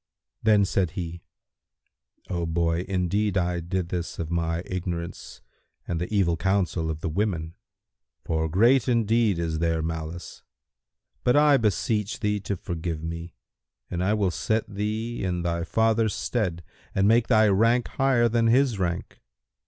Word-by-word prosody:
Then 105 -2 +4
said 90 -3 0
he, 85 -1 -5 1.1
"O 85 -2 -2
boy, 85 +1 0
indeed 100 +2 0
I 90 -1 0
did 85 +1 -3
this 90 -1 -4
of 85 -1 -4
my 85 0 -1
ignorance 85 -1 -5 0.4
and 85 - -2
by 90 - -1
the - - -19
evil 90 -4 +3
counsel 90 -2 0
of 80 0 -4
the - - -2
women, 85 -2 -1 0.7
for 80 -1 -1
'Great 115 - +4
indeed 115 -4 +2
is 80 -2 -2
their 80 -1 0
malice'[FN#172]; 80 +1 -5 0.8
but 125 - +3
I 145 -1 +6
beseech 105 -1 0
thee 105 -1 0
to 100 0 -3
forgive 85 -2 -4
me 85 0 -6 0.6
and 90 0 -1
I 105 +3 +2
will 100 -4 +1
set 110 +4 -1
thee 110 +3 -3
in 90 -2 -1
thy 85 0 -1
father's 110 +3 +1
stead 90 -8 -2 0.3
and 95 +1 +3
make 115 +1 +4
thy 110 -3 +5
rank 115 +5 +3
higher 130 -3 +2
than 115 0 +2
his 125 -2 +3
rank. 85 -2 -3
95 Hz, 150 wpm, -26 LUFS, 85-110 Hz, 1.1 s, I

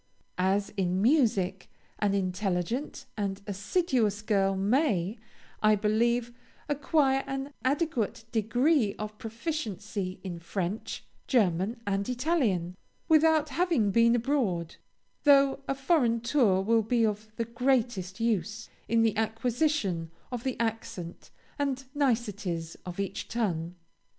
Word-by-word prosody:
As 195 +2 +2
in 185 -1 +1
music, 205 - +2 0.3
an 200 -1 +2
intelligent 190 - -2
and 200 -2 -2
assiduous 210 - 0
girl 195 -3 +2
may, 210 - +1 0.4
I 215 0 +5
believe, 235 +3 +1 0.3
acquire 280 -2 +2
an 270 +1 -4
adequate 260 - 0
degree 235 +1 +2
of 215 0 -6
proficiency 220 - -4
in 175 -3 -5
French, 185 +4 -4 0.2
German, 210 -1 +1
and 200 +1 -1
Italian, 245 - 0 0.3
without 315 -1 +4
having 320 - +1
been 235 +2 +5
abroad, 230 - 0 0.5
though 275 -2 +5
a 275 - 0
foreign 270 -5 +2
tour 230 -7 +3
will 225 +2 +3
be 230 +1 +2
of 215 0 -2
the 230 - -2
greatest 235 -6 0
use 225 0 -1 0.2
in 230 0 +3
the 220 -2 +2
acquisition 225 - 0 0.2
of 245 -2 -4
the 260 -2 -2
accent 220 -7 -4 0.3
and 270 -2 -1
niceties 205 - -1
of 180 +1 -6
each 195 -1 -3
tongue. 180 -7 -2
225 Hz, 115 wpm, -29 LUFS, 195-265 Hz, 0.5 s, I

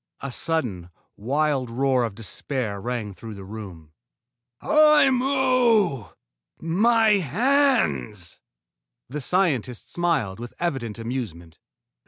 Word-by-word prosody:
A 140 - -5
sudden, 120 - -3 0.3
wild 135 +2 0
roar 130 +1 +1
of 110 -4 -6
despair 110 -1 -4
rang 120 -3 -4
through 110 +4 -9
the 100 - -9
room. 95 -7 -10 0.7
"Aimu! 255 - +3 0.5
My 220 +7 +3
hands!" 170 - 0 0.7
The 145 +3 -5
scientist 135 - -1
smiled 155 - 0
with 120 0 -8
evident 135 -11 -3
amusement. 110 -9 -6
130 Hz, 95 wpm, -24 LUFS, -, 0.7 s, Aimu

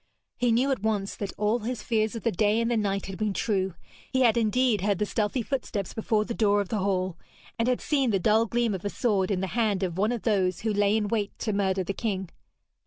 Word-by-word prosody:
He 245 -1 +1
knew 255 +5 +2
at 260 - -1
once 205 -2 -1
that 200 -2 -4
all 210 +3 +1
his 240 +2 -4
fears 220 -1 0
of 230 - -6
the 230 - +2
day 210 +3 +2
and 230 +1 0
the - - +2
night 200 -3 0
had 195 0 -7
been 210 -2 -1
true. 190 -5 0 0.4
He 260 - +1
had 235 -3 +5
indeed 235 -1 +2
heard 200 0 +1
the 210 - 0
stealthy 215 +4 -1
footsteps 220 -7 -3
before 215 -1 0
the 235 - -4
door 205 -2 +3
of 200 - -2
the 215 - -1
hall, 185 -3 -1 0.4
and 230 - +2
had 250 -1 +1
seen 275 -4 +1
the 200 - +2
dull 220 +4 +3
gleam 235 -1 +1
of 185 - -5
a 205 - -1
sword 200 -4 0
in 190 -3 0
the - - 0
hand 215 -5 +1
of 180 -1 -2
one 210 +3 +2
of 240 -3 -3
those 190 -5 +1
who 220 -1 0
lay 205 +1 +3
in 210 -1 0
wait 205 -1 -2
to 215 - -2
murder 190 -1 +1
the 195 - -3
king. 190 -3 -3
210 Hz, 250 wpm, -27 LUFS, 195-230 Hz, 0.4 s, had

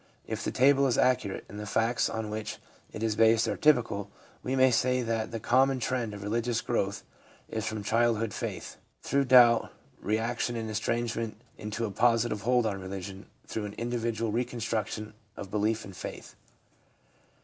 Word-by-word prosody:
If - - -4
the - - -1
table 140 +1 +4
is 125 - +1
accurate, 125 -6 +1
and 105 +2 -9
the 105 - -6
facts 115 +3 +1
on 110 -1 -4
which 110 0 -4 0.3
it 110 - -6
is 110 -2 +1
based 115 +1 +4
are - - 0
typical, 120 -9 +2 0.3
we 130 - -2
may 130 0 +5
say 125 +1 +2
that 115 -1 -1
the 115 - -4
common 130 +4 +3
tre?id 120 -2 -1
of 100 - -8
religious 115 +2 0
gi'owth 100 -4 -1 0.4
is 110 0 -3
from 110 -1 -3
childhood 115 0 +1
faith, 105 -6 -5 0.3
through 140 0 +1
doubt, 120 -3 +6 0.3
reaction 115 +3 -1
and 110 -1 -3
estrangement, 115 0 -2 0.2
into 105 +2 -4
a 105 - -4
positive 115 0 +2
hold 125 +1 +2
on 100 -3 -2
religion, 95 +1 -7 0.2
through 110 - -4
an 100 - -6
individual 115 -1 -2
reconstruction 110 -2 -2 0.2
of 100 - -7
belief 110 +1 0
and 95 -2 -10
faith. - - -8
115 Hz, 165 wpm, -29 LUFS, 105-120 Hz, 0.4 s, doubt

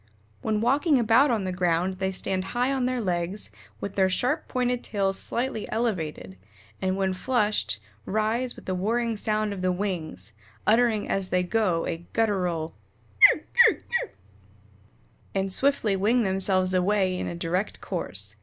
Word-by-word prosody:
"When 215 -1 0
walking 280 +5 +3
about 235 +4 +4
on 225 -5 +1
the 185 - -2
ground 180 +1 0
they 190 0 0
stand 190 0 -1
high 250 +3 +2
on 260 -2 0
their 255 0 0
legs, 180 0 -2 0.3
with 200 - -5
their 190 -1 +3
sharp 255 - 0
pointed 250 -1 -1
tails 195 -2 -1
slightly 240 -3 -3
elevated, 160 - -3 0.4
and 190 0 0
when 190 -1 0
flushed, 210 - 0 0.3
rise 220 +4 0
with - - -14
a 185 - 0
whirring 230 +5 0
sound 215 0 -1
of 190 - -6
the 185 0 +1
wings, 165 - -4 0.3
uttering 225 -1 +3
as 195 -1 -1
they 180 0 +2
go 180 -4 +1
a 165 - -2 0.2
guttural 180 -8 0 0.6
kuk 310 - -4 0.2
kuk 455 - +5 0.2
kuk, - - -5 1.3
and 195 0 -1
swiftly 270 -7 +1
wing 225 +6 +2
themselves 190 -1 0
away 185 0 +2
in - - -3
a 170 - -4
direct 180 +4 -2
course. 100 - -4
195 Hz, 155 wpm, -26 LUFS, 185-230 Hz, 1.3 s, kuk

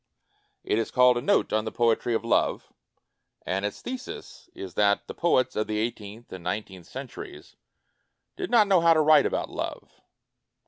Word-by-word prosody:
It 110 - 0
is 115 - -2
called 125 0 +5
"A 120 - -1
Note - - +1
on 110 0 +2
the 110 - -4
Poetry 120 0 +1
of 115 - -2
Love", 115 - 0 0.7
and 95 +1 -2
its 105 - -4
thesis 255 0 -8
is 95 -3 -8
that 100 -1 +2
the - - -7
poets 130 -7 +1
of 110 - -1
the 110 - -2
eight 115 +2 -1
eenth 105 +3 -11
and 95 -2 -8
nineteenth 95 -1 -5
centuries 140 - -9 0.8
did 375 -2 -4
not 230 -3 +5
know 190 -4 +4
how 165 0 +5
to 155 - +4
write 155 -2 +5
about - - -3
love. - - -6
115 Hz, 180 wpm, -26 LUFS, 105-155 Hz, 0.8 s, called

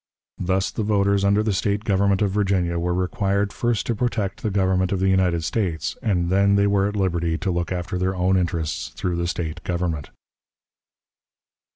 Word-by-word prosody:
Thus 95 +1 0
the - - -3
voters 100 -1 +2
under 100 +2 +3
the 110 -2 0
State 100 +2 0
government 100 -1 +2
of 100 - +1
Virginia 95 -4 0
were 90 +1 -1
required 100 +2 0
first 120 -4 0
to 120 - 0
protect 110 -4 -2
the 110 - -1
Government 95 -2 +1
of 100 - 0
the 95 +1 +2
United 90 -3 +2
States, 90 -5 -2
and 90 -6 0
then 100 +1 +4
they 100 0 +3
were 100 -1 +2
at 105 - -4
liberty 85 -4 0
to 95 - -2
look 85 0 -2
after 90 0 -3
their 95 +1 0
own 90 +1 +2
interests 80 -8 -1
through 90 -1 -2
the 85 0 -1
State 85 -1 -4
government. 85 -5 -2
95 Hz, 185 wpm, -23 LUFS, 85-100 Hz, -, then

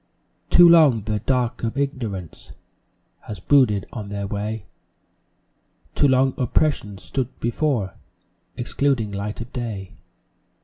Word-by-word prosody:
Too 175 -1 +8
long 155 -10 +6
the 105 0 -2
"Dark 125 -2 -1
of 115 +3 -2
Ignorance" 115 - -4 0.7
Has 105 -4 -6
brooded 105 -3 +3
on 105 -4 -6
their 100 0 -4
way; 105 0 -4 1.3
Too 145 - +3
long 130 0 +3
Oppression 125 -5 0
's - - -16
stood 130 -2 -4
before, 120 - -1 0.6
Excluding 120 -3 0
light 100 +2 -4
of 120 - -9
day. 110 -7 -5
115 Hz, 120 wpm, -22 LUFS, 105-135 Hz, 1.3 s, Too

